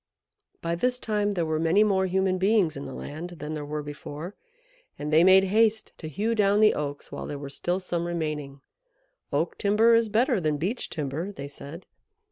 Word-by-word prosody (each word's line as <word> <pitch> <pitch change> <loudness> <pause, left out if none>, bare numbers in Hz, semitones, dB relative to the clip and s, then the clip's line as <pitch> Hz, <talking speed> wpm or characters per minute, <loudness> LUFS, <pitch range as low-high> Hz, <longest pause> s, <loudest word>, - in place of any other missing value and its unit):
By 170 0 -1
this 250 +9 0
time 210 -3 -1
there 170 -2 0
were 155 -1 -1
many 165 +6 +4
more 190 -3 +2
human 185 0 +1
beings 195 -4 +3
in 140 - -6
the 135 - -7
land 170 +4 -7
than 150 +1 -5
there 150 -1 -4
were 150 +1 -4
before, 150 +4 -7 0.6
and 150 +1 -4
they 160 +2 +7
made 190 +1 +7
haste 220 +3 +2
to 160 - -6
hew 215 +10 -1
down 205 -2 +3
the 215 0 +6
Oaks 145 -1 -5
while - - -6
there 145 - -5
were 140 -1 -7
still 175 +5 -1
some 175 -2 -3
remaining. 150 -5 -4 0.7
"Oak - - -1
timber 215 +3 +4
is 230 -1 +3
better 230 0 +2
than 155 -2 0
Beech 195 - -2
timber," 155 +5 -3
they 140 -8 -7
said. 145 +4 -10
175 Hz, 195 wpm, -26 LUFS, 150-205 Hz, 0.7 s, they